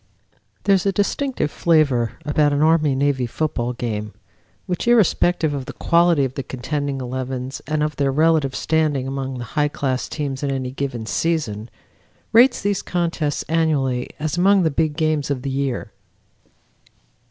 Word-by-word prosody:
There 200 - +4
is 195 0 +2
a - - +3
distinctive 205 - -1
flavor 140 -9 +2
about 150 0 +2
an 145 +1 +2
Army 155 -3 +3
Navy 135 -2 +1
football 125 -2 -2
game 105 -3 -4 0.5
which, 180 +3 -3
irrespective 175 -8 +3
of 135 -2 -4
the - - -6
quality 170 -4 +3
of 130 - -4
the 140 - -4
contending 140 +2 -3
elevens 130 +1 -4
and 155 -1 0
of 150 0 -2
their 140 -1 +1
relative 155 -2 +2
standing 150 -5 0
among 135 -1 -4
the 120 - -5
high 150 -1 +2
class 130 -3 -2
teams 140 -3 -4
in 140 - -1
any 130 -2 -2
given 130 -4 -4
season, 120 -8 -1 0.6
rates 240 +1 +5
these 205 -1 0
contests 170 -4 -1
annually 145 -6 0
as 155 +2 -2
among 195 +1 +4
the 160 - +2
"big 155 +1 0
games" 155 -3 0
of 130 -3 -2
the 135 - -2
year. 135 -2 -2
145 Hz, 160 wpm, -21 LUFS, 130-160 Hz, 0.6 s, rates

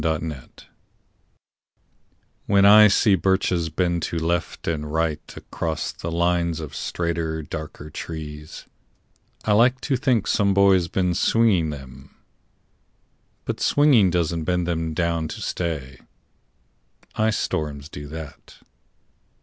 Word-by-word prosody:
BIRCHES 80 -4 -4 1.8
When 100 -1 +4
I 105 +1 +9
see 100 +1 +3
birches 95 -2 +1
bend 85 +1 0
to 85 - -3
left 85 +2 -2
and 75 -2 -2
right 80 -1 0 0.2
Across 80 -1 -4
the 85 - -6
lines 85 -1 0
of 75 -3 -7
straighter 80 -2 -3
darker 75 -1 -8
trees, 75 -1 -8 0.8
I 110 - +1
like 125 +4 +4
to 140 - 0
think 125 -5 +1
some 100 -3 +2
boy's 95 -3 +4
been 90 0 0
swinging 95 -3 +2
them. 70 -1 -10 1.3
But - - -3
swinging 140 -10 +4
doesn't 85 -2 -1
bend 90 0 0
them 80 -2 -2
down 85 -2 0
to - - -7
stay. 70 -7 -4 1.1
Ice 110 -1 +1
storms 75 -2 -3
do 75 -2 -9
that. 80 -1 -10
85 Hz, 115 wpm, -23 LUFS, 80-95 Hz, 1.8 s, I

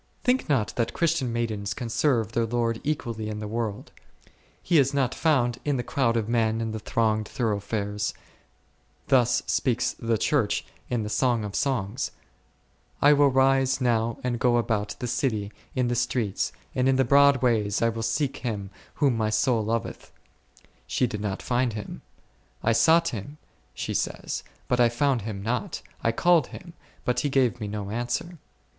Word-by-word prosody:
Think 250 -6 +1
not 125 -8 +1
that 115 -1 0
Christian 160 -7 +1
maidens 110 -3 -2
can 120 - -4
serve 115 -2 +1
their 115 0 0
Lord 115 -1 -1
equally 115 -7 -2
in 105 - -4
the 105 0 -5
world. 110 -2 -4 0.7
He 170 - +4
is 135 +1 +2
not 130 -2 +1
found 130 -7 +1
in 145 -2 0
the 125 - -2
crowd 120 -4 +1
of 110 -2 -1
men 115 -1 +1
and 110 -1 -2
the 110 - -4
thronged 110 -1 0
thoroughfares; 105 -2 -2 0.9
thus 125 -3 +3
speaks 125 -4 0
the 115 -1 -1
Church 115 -1 +1 0.2
in 120 -3 0
the 105 - -4
Song 120 -1 +1
of 105 -1 -5
Songs, 125 -2 -1 0.9
I 145 +1 +6
will 145 0 +5
rise 135 0 +3
now 115 -2 +1
and 120 -2 -1
go 120 0 +3
about 110 -3 -1
the - - -4
city 120 -4 -1 0.2
in 125 -2 +1
the 120 - 0
streets, 115 -4 -1 0.2
and 130 +1 +2
in 135 - +4
the 130 0 +3
broad 140 0 +5
ways 105 -4 +2
I - - +4
w 115 0 0
ill - - -2
seek 120 +5 -1
Him 105 -5 -4 0.2
whom 140 -5 +2
my 110 -1 0
soul 115 0 +2
loveth: 115 +1 -3 0.8
she 130 - +1
did 105 -3 -4
not 100 -2 -3
find 125 -1 +1
Him; 105 -1 -7 0.4
/ 110 - -2
sought 165 +8 +4
Him, 125 +7 -7 0.4
she - - -3
says, - - -2 0.3
but 125 - +1
I 120 -1 +6
found 130 +1 +1
Him 100 -2 -5
not, 115 0 -2 0.2
I 115 - +3
called 170 +3 +3
Him 175 -2 -11 0.3
but 125 - +1
He 145 - 0
gave 130 -3 +2
me 105 - -3
no 100 -1 -5
answer. 125 +9 -3
120 Hz, 175 wpm, -26 LUFS, 110-130 Hz, 0.9 s, I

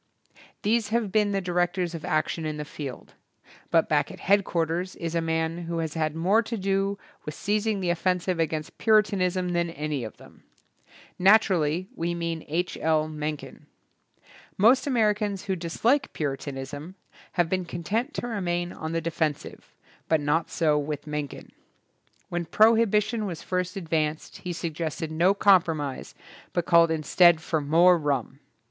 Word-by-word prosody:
These 220 +1 +2
have 225 -3 0
been 210 -1 +2
the 195 -1 0
directors 175 0 0
of 165 -2 -6
action 155 +1 -1
in 155 -1 -3
the 150 - -5
field, 140 -3 -8 0.6
but 165 -1 +3
back 150 -1 +1
at - - -11
head 200 +1 +3
quarters 170 +1 -2
is 165 -1 -4
a 170 - +1
man 160 +1 -1
who 170 0 -3
has 160 -2 -2
had 155 -1 -1
more 190 +7 +3
to 230 +1 -4
do 195 0 0 0.3
with 150 - -6
seizing 210 0 0
the 175 -2 +1
offensive 180 0 0
against 155 -1 -2
Puritanism 190 -4 +2
than 170 -1 0
any 150 -4 -3
of 110 - -8
them. - - -17 0.8
Nat 200 +4 +7
urally 170 -2 0
we 170 +1 -2
mean 165 -1 -3
H. 175 +4 -2
L. 155 -1 +2
Mencken. 150 -1 -6 0.9
Most 240 +8 +5
Americans 210 -5 +1
who 195 -2 -1
dislike 230 - 0
Puritanism 145 +3 -5 0.4
have 175 -2 +2
been 185 +1 -1
content 215 - -3
to - - -3
remain 175 -6 -2
on 160 +1 -5
the 165 - 0
de 165 +1 -3
fensive, 155 -2 -3 0.4
but 160 - +4
not 145 +3 0
so 155 -3 +2
with 145 0 -4
Mencken. 150 -2 -5 0.8
When 175 0 -2
prohibition 220 +2 +3
was 170 -4 -6
first 180 0 -2
advanced 160 -3 -2
he 180 - -6
suggested 160 -1 -4
no 175 +5 +3
compromise 165 -9 +2 0.4
but 175 - 0
called 170 -1 +5
instead 160 +2 +4
for 160 -1 -1
more 170 +5 +5
rum. 140 -3 -2
170 Hz, 155 wpm, -26 LUFS, 155-195 Hz, 0.9 s, Nat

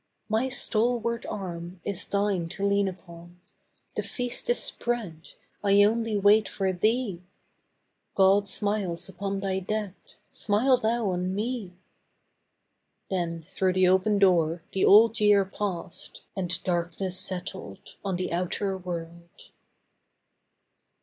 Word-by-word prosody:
My 225 +5 +1
stalwart 235 -1 -1
arm 175 -2 -6
is 200 -2 -4
thine 200 -4 0
to 195 - -3
lean 200 0 +2
upon; 175 -1 -10 0.6
The - - 0
feast 245 -1 -4
is 240 - +4
spread, 210 -10 -3 0.3
I 200 0 +5
only 225 0 +1
wait 205 +2 +4
for 190 -1 -1
thee; 215 -1 0 0.9
God 195 +1 +4
smiles 200 -5 -1
upon 195 +1 -4
thy 190 -1 -1
dead, 205 0 -3 0.4
smile 240 +6 +2
thou 225 -3 0
on 180 +1 -2
me.' 215 -3 -3 1.4
Then 170 -3 -2
through 185 -1 0
the 185 0 +4
open 190 +3 +3
door 170 -4 +3
the 190 - +2
Old 225 +2 +6
Year 205 -2 +5
passed 190 -3 -5
And 180 -2 -2
darkness 180 +1 -1
settled 180 - -4
on 195 -2 -1
the 180 -1 -3
outer 185 +3 -1
world. 170 -1 -8
195 Hz, 120 wpm, -27 LUFS, 180-210 Hz, 1.4 s, Old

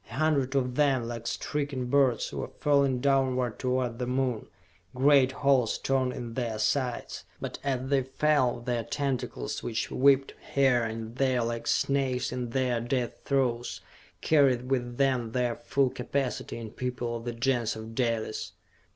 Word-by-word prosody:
A 120 - -8
hundred 140 -3 +1
of 125 -2 +1
them, 135 -4 +2
like 115 -1 -5
stricken 140 -3 -2
birds, 130 -2 +2
were - - -4
falling 140 -3 +3
downward 130 -4 +1
toward 125 -2 -1
the 125 - -2
Moon, 125 -3 -1 0.5
great 135 0 +5
holes 135 -4 +2
torn 130 -1 0
in 120 -2 -6
their 115 -3 -2
sides. 120 +3 -1 0.2
But - - -5
as 130 -2 -1
they 140 -1 +4
fell, 130 -2 +1
their 120 -1 -1
tentacles, 140 0 -3
which 110 -2 -3
whipped 135 0 +4 0.2
here 135 -3 +4
and 115 +1 -5
there 130 -3 +2
like 115 0 -3
snakes 135 -2 +1
in 125 -1 -3
their 125 -1 0
death 120 0 -2
throes, 125 -3 0 0.4
carried 135 -4 +3
with 120 -2 -1
them 130 -5 +1
their 125 -2 0
full 135 -1 0
capacity 130 0 -3
in 115 -2 -7
people 125 -2 -3
of 115 - -10
the 120 - -3
Gens 120 -1 0
of 110 +1 -8
Dalis! 115 -3 -2
125 Hz, 155 wpm, -28 LUFS, 120-135 Hz, 0.5 s, great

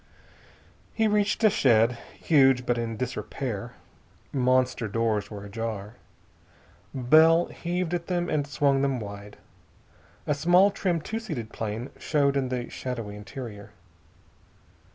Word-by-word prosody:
He 225 -1 +2
reached 210 +1 +1
a 215 - +6
shed, 120 - +3 0.2
huge, 135 -5 +4
but 120 -1 0
in 115 -1 -3
disrepair. 125 -2 -4 0.6
Monster 130 -3 +1
doors 110 -1 -1
were 100 -1 -8
ajar. 105 0 -5 1.0
Bell 160 +6 +5
heaved 175 0 -3
at 170 -1 -2
them 175 -1 -1
and 145 -2 -1
swung 140 -1 +2
them 135 -2 0
wide. 100 -1 -9 0.9
A 150 - +1
small, 175 +7 +4
trim, 180 -4 -1
two 220 +8 -4
seated 150 - -6
plane 110 +3 -4
showed 140 -2 +1
in 135 -2 0
the 125 -1 -3
shadowy 115 -5 -5
interior. 105 0 -9
130 Hz, 125 wpm, -26 LUFS, 115-160 Hz, 1.0 s, a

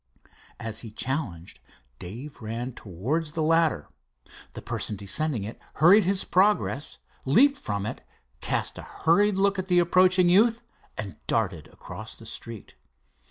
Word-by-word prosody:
As 110 -1 -4
he 115 - -7
challenged, 110 - -4 0.4
Dave 120 +12 -9
ran 115 +3 -4
towards 135 - -3
the 160 -2 -1
ladder. 165 - +2 0.7
The - - -8
person 105 - -2
descending 105 +5 0
it 110 +3 -7 0.2
hurried 180 +6 +6
his 190 +1 +1
progress, 185 -6 +1 0.3
leaped 270 - +4
from 100 -1 -3
it, - - -5 0.4
cast - - -1
a - - -13
hurried 205 +5 +4
look 195 0 +2
at 185 - -3
the 180 -1 +3
approaching 180 +1 +4
youth, 225 +6 +4 0.3
and 100 -3 -6
darted 95 -9 -1
across - - -9
the - - -14
street. 115 -3 -8
155 Hz, 140 wpm, -26 LUFS, -, 0.7 s, hurried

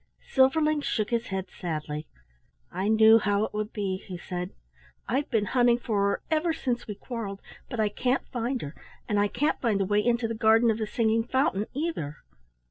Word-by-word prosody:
Silverling 300 +3 +4
shook 215 -5 -1
his 235 0 0
head 190 -1 -3
sadly. 155 -2 -4 0.6
"I 190 +2 -2
know 220 +1 +7
how 205 -1 +1
it - - -8
would 210 +1 -3
be," 195 -3 -2
he 185 -2 -6
said. 180 0 -5 0.6
"I've 270 +4 0
been 220 -5 +1
hunting 240 0 +3
for 220 -4 -1
her - - -2
ever 320 +1 +2
since 245 -5 -2
we 210 - -5
quarrelled, 210 -3 -6 0.3
but 240 - -5
I 215 -1 +3
can't 250 +5 0
find 245 0 -2
her, 145 - -6 0.3
and 210 -2 +1
I 205 - +3
can't 290 +9 -1
find 220 -5 +1
the 195 - +1
way 205 +2 +2
into 235 -1 +1
the 230 - -3
garden 225 +1 +4
of 220 - -3
the 215 - -2
singing 225 0 +1
fountain 230 -5 0
either." 275 - -3
220 Hz, 195 wpm, -27 LUFS, 200-245 Hz, 0.6 s, know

